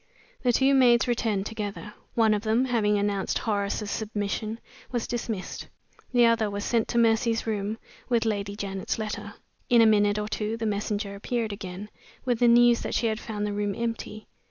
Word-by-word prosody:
The 250 - +3
two 265 +3 +3
maids 245 -2 +5
returned 225 -5 0
together. 210 -1 -5 0.2
One 225 -2 +4
of 210 - 0
them, 225 +4 +2
having 215 -5 +2
announced 200 -1 0
Horace's 205 -1 -2
submission, 215 +1 -3 0.3
was 240 -2 -1
dismissed. 225 -5 -4 0.4
The 245 -1 +5
other 230 -2 +3
was 200 0 -4
sent 230 -2 +1
to 235 - -2
Mercy's 230 0 +2
room 215 -1 -2 0.3
with 235 -2 +2
Lady 200 -2 -2
Janet's 195 -2 -3
letter. 210 -1 -5 0.3
In 240 - +6
a 230 - +7
minute 205 -1 +4
or 210 0 -2
two 215 +1 -2
the 225 - -3
messenger 205 -1 -2
appeared 220 +2 -2
again, 195 0 -7 0.4
with 245 -3 +1
the 245 - +5
news 240 0 +6
that - - -3
she - - +1
had 220 -1 0
found 210 -3 -4
the 205 - -2
room 205 -1 -1
empty. 230 -2 -4
220 Hz, 180 wpm, -26 LUFS, 205-230 Hz, 0.4 s, a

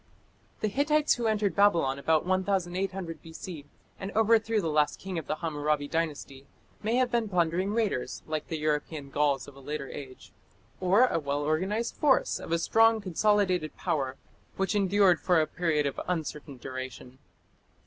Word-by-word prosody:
The 215 - +1
Hittites 295 +6 +2
who 235 -2 -1
entered 210 -5 +1
Babylon 170 -10 +3
about 160 +3 +2
1800 185 -2 -1
B.C., 160 -2 -9 0.3
and 195 +1 -5
overthrew 225 0 +3
the 175 - -1
last 150 -1 +2
king 190 -3 -4
of 160 - -9
the - - -1
Hammurabi 150 -3 -1
Dynasty, 145 -4 -3 0.3
may 220 +3 0
have 255 -1 +2
been 235 -3 0
plundering 180 +1 +1
raiders, 215 - -1
like 155 -1 -3
the 160 - -3
European 150 -1 -2
Gauls 140 -2 +1
of 140 - -12
a - - -13
later 140 0 -5
age, 130 -2 -10 0.5
or 190 +7 +5
a 165 - 0
well 145 -1 -2
organized 190 +10 -1
force 290 -4 +2
of - - -8
a 170 - +3
strong, 225 +6 +4
consolidated 185 -3 +1
power, 140 -7 -1 0.4
which 195 +2 0
endured 200 -2 +4
for 175 -3 +3
a 155 - +3
period 155 -3 0
of 140 - -2
uncertain 150 -5 -4
duration. 130 0 -8
170 Hz, 160 wpm, -28 LUFS, 150-205 Hz, 0.5 s, or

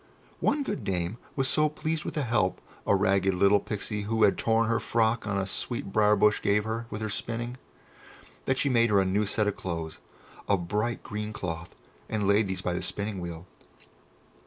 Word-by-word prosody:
One 285 0 +1
good 205 -6 -3
dame 90 +4 -2 0.2
was 135 -1 +1
so 155 +2 +3
pleased 155 +1 -3
with - - -4
the 150 - 0
help 105 -7 +1 0.3
a - - +5
ragged 95 -1 +2
little 100 +2 +5
Pixie 105 0 -3
who 110 -1 +2
had 100 - +5
torn 115 0 +2
her 115 0 +2
frock 115 0 +1
on 100 -1 0
a 95 - 0
sweet 100 +1 -3
briar 105 -1 +5
bush 105 0 +3
gave 105 +1 +2
her 115 +1 -3
with 105 - -5
her 110 - -2
spinning, 120 +4 -3 0.9
that 130 - +1
she 140 - +1
made 115 -3 +4
her 100 -1 +4
a 95 - +3
new 100 +3 +1
set 105 +1 +1
of 105 -1 0
clothes 80 -3 -5 0.5
of 90 -4 +1
bright 105 +5 -1
green 105 0 -4
cloth, 85 -4 -5 0.3
and 105 -3 0
laid 100 +1 +4
these 95 0 -3
by 90 - -1
the 90 - -2
spinning 100 -1 -3
wheel. 85 -1 -6
105 Hz, 200 wpm, -28 LUFS, 95-115 Hz, 0.9 s, a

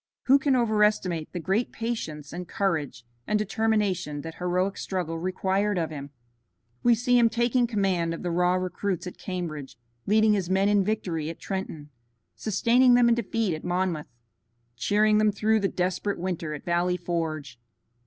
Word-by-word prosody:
Who 275 +2 +5
can 275 -1 +2
overestimate 210 -8 +1
the 180 - -4
great 195 +8 0
patience 160 -11 -4
and 180 0 -6
courage 155 - -2 0.2
and 210 - +2
determination 210 -7 0
that 165 +1 -7
heroic 180 +2 0
struggle 170 -4 -3
required 190 +3 0
of 165 -2 -1
him? 140 -2 -7 0.7
We 240 -1 +5
see 245 +2 +3
him 230 -1 +5
taking 240 +1 +1
command 190 -7 0
of - - -9
the 175 - -1
raw 180 +1 +2
recruits 185 0 -2
at 180 - -8
Cambridge, 165 -7 -5 0.3
leading 215 +1 +4
his 190 -4 -1
men 195 +2 +3
in 205 -1 +3
victory 180 -7 -2
at 165 - -8
Trenton, 165 -6 -5 0.4
sustaining 240 +4 +3
them 240 -1 +5
in - - +5
defeat 225 -4 -1
at 155 - -6
Monmouth, 175 -3 -1 0.7
cheering 210 - +3
them 215 -1 +4
through 220 +2 +2
the 200 - +1
desperate 185 +2 -1
winter 170 -4 -3
at 145 - -10
Valley 175 +1 +1
Forge. 160 -6 -3
190 Hz, 165 wpm, -26 LUFS, 170-215 Hz, 0.7 s, Who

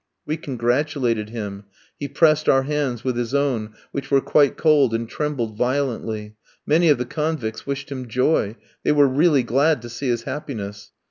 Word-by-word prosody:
We 155 - -1
congratulated 125 -4 -1
him. 105 -3 -6 0.3
He 145 - -3
pressed 155 +2 +3
our 135 0 +5
hands 135 -4 -2
with 130 -2 -1
his 120 +2 -2
own, 120 -7 0 0.2
which 140 -1 -5
were 140 - +5
quite 140 0 +3
cold, 145 -7 +4
and 115 0 -2
trembled 120 -5 -3
violently. 115 -4 -2 0.3
Many 165 +2 +4
of 150 - +5
the 125 - -2
convicts 150 -6 -3
wished 140 0 -4
him 130 -2 -5
joy; 120 -2 +1 0.3
they - - +2
were 145 -1 +5
really 145 0 +3
glad 140 +6 +2
to 120 - -7
see 125 +3 -4
his 120 -1 0
happiness. 105 -9 -6
130 Hz, 175 wpm, -22 LUFS, 115-145 Hz, 0.3 s, our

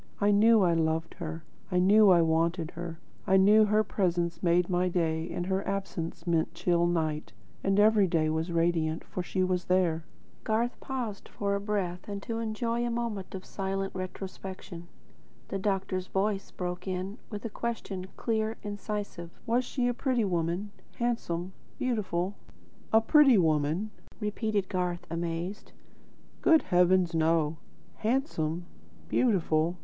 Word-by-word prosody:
I 205 0 +4
knew 215 +1 +6
I 175 -2 +3
loved 160 0 0
her; 165 -1 -5 0.3
I 180 - +1
knew 200 +3 +6
I 175 -2 +6
wanted 165 +1 +1
her; 170 -1 -6 0.3
I 190 - +5
knew 210 +3 +6
her 215 +1 +3
presence 175 -4 -1
made 175 0 +3
my 180 0 +1
day 165 -2 0
and 175 - -3
her 190 +1 0
absence 190 -4 -4
meant 170 -1 0
chill 170 0 +2
night; 155 -7 -1 0.3
and 195 +1 +2
every 210 -2 +5
day 165 -2 +1
was 160 +2 -1
radiant, 165 -1 +1
for 180 - -5
she 185 +1 -1
was 185 -1 0
there." 175 -3 +2 0.4
Garth 230 +2 0
paused 240 -7 -5
for 200 -1 -1
breath 195 -4 -2
and 200 -1 -5
to 230 -1 -3
enjoy 230 +1 -1
a 240 - 0
moment 230 -6 -3
of 185 - -7
silent 195 0 -3
retrospection. 185 -1 -7 0.6
The 195 - -2
doctor's 190 -2 -1
voice 195 0 -1
broke 180 0 -5
in 190 +4 -3
with 210 0 -6
a - - -2
question, 200 -6 -4
clear, 220 -1 -1
incisive. 205 -4 -5 0.2
"Was 245 +2 +2
she 250 0 -1
a 245 - +1
pretty 250 -2 0
woman; 175 +2 -1 0.2
handsome, 190 -7 -2 0.2
beautiful?" 200 -7 -1 0.6
"A 220 - +6
pretty 275 0 +6
woman?" 160 +4 +1 0.3
repeated 210 -2 -1
Garth, 180 -2 -2
amazed: 170 +4 -4 0.7
"Good 320 -1 +5
heavens, 180 -1 +3
no! 160 -1 +2 0.4
Handsome? 180 - -1 0.4
Beautiful? 170 -7 +2
185 Hz, 145 wpm, -29 LUFS, 170-210 Hz, 0.7 s, knew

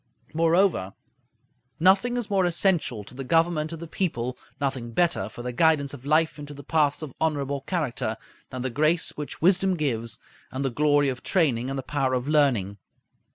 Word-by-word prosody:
Moreover, 165 - +2 0.8
nothing 195 +8 +4
is 240 -4 -2
more 195 -2 +3
essential 170 - 0
to 100 - -14
the 135 +2 -6
government 165 +2 +1
of 165 - -5
the 170 - -7
people, 130 -9 -2 0.2
nothing 130 -4 -3
better 165 - +1
for 120 - -9
the 125 0 -4
guidance 145 0 +2
of 140 -1 -10
life 155 +1 +2
into 145 0 -8
the 140 - -10
paths 150 0 +1
of 145 -5 -7
honorable 140 -3 -1
character, 130 - -2 0.3
than 130 -1 -5
the 130 - -2
grace 155 +6 +1
which 150 +1 -7
wisdom 190 +1 +4
gives, 115 -8 -2 0.3
and 130 +1 -3
the 135 - 0
glory 145 +1 +3
of 130 - -4
training 130 -9 +1
and 135 - -3
the 135 - -4
power 135 -1 0
of 125 +1 -2
learning. 125 -10 +2
145 Hz, 180 wpm, -25 LUFS, 130-165 Hz, 0.8 s, nothing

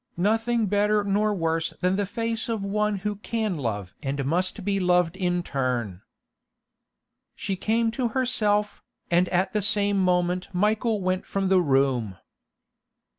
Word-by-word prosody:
Nothing 225 +4 +1
better 205 +1 +2
nor 205 +1 +1
worse 165 -4 -1
than 180 +1 +1
the 200 0 -1
face 230 +1 -2
of 220 -3 -2
one 210 +1 0
who 210 -1 -1
can 215 -3 -2
love 105 -8 -4
and 140 0 -2
must 185 +6 0
be 200 -1 +1
loved 180 -2 +2
in 180 -2 -1
turn. 125 - -2 1.3
She 195 - -3
came 225 +4 0
to 245 +2 -1
herself, 210 -4 0 0.3
and 175 +1 +3
at 185 +1 0
the 210 - +1
same 205 0 +2
moment 180 0 +1
Michael 215 +3 +1
went 185 0 -1
from 195 -1 -1
the 190 -1 +5
room. 135 - +1
195 Hz, 145 wpm, -25 LUFS, 175-210 Hz, 1.3 s, the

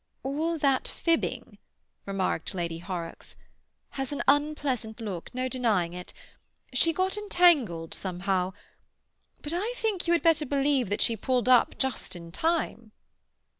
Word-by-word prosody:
"All 315 +5 -1
that 275 -3 +2
fibbing," 335 -1 -1 0.5
remarked 190 -2 -1
Lady 170 -2 -3
Horrocks, 175 -2 -6 0.5
"has 270 0 -4
an 290 - -2
unpleasant 280 -6 +1
look. 195 -7 -5
No 255 0 -2
denying 220 -10 +1
it. 180 0 -8 0.6
She 330 +6 +4
got 375 +4 0
entangled 315 - +3
somehow. 185 0 -1 0.9
But 295 - 0
I 415 +8 -1
think 425 -7 -1
you 340 - +4
had 340 - +2
better 315 -3 +4
believe 275 -4 +2
that 205 - -1
she 230 - +3
pulled 250 +3 0
up 250 -2 +5
just 265 -7 -2
in 170 -1 -9
time." 235 - -1
255 Hz, 135 wpm, -28 LUFS, 190-315 Hz, 0.9 s, up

